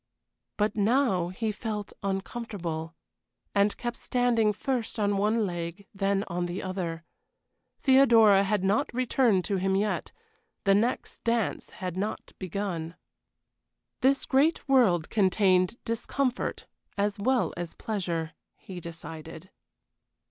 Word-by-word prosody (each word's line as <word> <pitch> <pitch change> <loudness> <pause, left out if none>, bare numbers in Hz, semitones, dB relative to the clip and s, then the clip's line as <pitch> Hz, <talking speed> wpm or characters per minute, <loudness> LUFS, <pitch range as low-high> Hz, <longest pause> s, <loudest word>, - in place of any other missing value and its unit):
But 210 0 +1
now 215 -4 +2
he 215 +4 -2
felt 210 -1 -5
uncomfortable, 190 -5 -4 0.6
and 200 0 +2
kept 240 -1 -4
standing 240 -3 +2
first 240 +2 -2
on 205 -1 +1
one 215 +2 +2
leg, 175 +1 -5
then 195 0 +1
on 175 +1 -2
the 175 +2 -4
other. 175 -3 -4 0.8
Theodora 230 -7 +6
had 200 -1 0
not 200 +3 +1
returned 245 -6 +2
to 200 - 0
him 190 +1 +1
yet: 210 +2 -1 0.5
the 195 - +4
next 225 +5 0
dance 230 -3 0
had 185 -1 -6
not 205 +3 -4
begun. 180 -3 -4 1.0
This 270 +2 +3
great 290 +5 +2
world 215 - +3
contained 190 -1 +3
discomfort 250 +2 -2 0.3
as 205 0 0
well 255 +4 +1
as 175 -1 -5
pleasure, 170 -7 -3 0.2
he 185 -2 -9
decided. 165 +1 -9
200 Hz, 120 wpm, -28 LUFS, 180-230 Hz, 1.0 s, Theodora